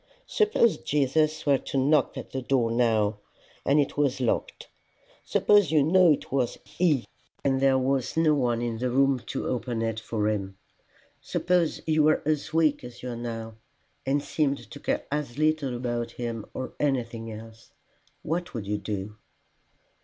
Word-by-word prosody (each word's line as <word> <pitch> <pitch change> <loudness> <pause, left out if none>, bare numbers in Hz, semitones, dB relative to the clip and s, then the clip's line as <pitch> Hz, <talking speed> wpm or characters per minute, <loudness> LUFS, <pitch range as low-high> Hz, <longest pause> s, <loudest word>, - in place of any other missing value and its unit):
Suppose 425 - +2
Jesus 155 +2 +1
were 140 -2 +4
to - - -4
knock 140 +1 +2
at - - -7
the 130 - -3
door 125 -3 +1
now, 110 -3 +2 0.4
and 140 +2 +3
it 145 - 0
was 140 -3 +1
locked; 125 -3 -2 0.6
suppose 205 -7 +3
you 155 -3 +4
knew 175 +2 +5
it 145 - -1
was 130 -3 0
he, 155 -8 +1 0.4
and 135 -1 +1
there 135 -1 +4
was 130 +1 0
no 160 -2 +4
one 120 -4 0
in 115 -2 -3
the 125 +1 0
room 135 +1 +3
to - - -3
open 120 -2 -2
it 115 -1 -2
for 110 -1 -2
him; 100 -3 -2 0.6
suppose 180 -3 0
you 155 -1 +3
were 155 +1 +3
as 155 -1 -1
weak 155 -2 +2
as 125 0 -10
you 125 - -4
are - - -5
now, 115 -2 -6 0.5
and 140 +2 0
seemed 140 -3 -1
to 145 - -9
care - - -2
as 145 -4 -3
little 155 -4 +1
about 120 -1 -3
him 115 -3 -5
or 130 - -6
anything 115 -5 -1
else: 110 +1 -11 0.5
what 170 0 -3
would 110 -4 -4
you 105 +1 -2
do?" 105 0 -5
130 Hz, 170 wpm, -27 LUFS, 115-150 Hz, 0.6 s, knew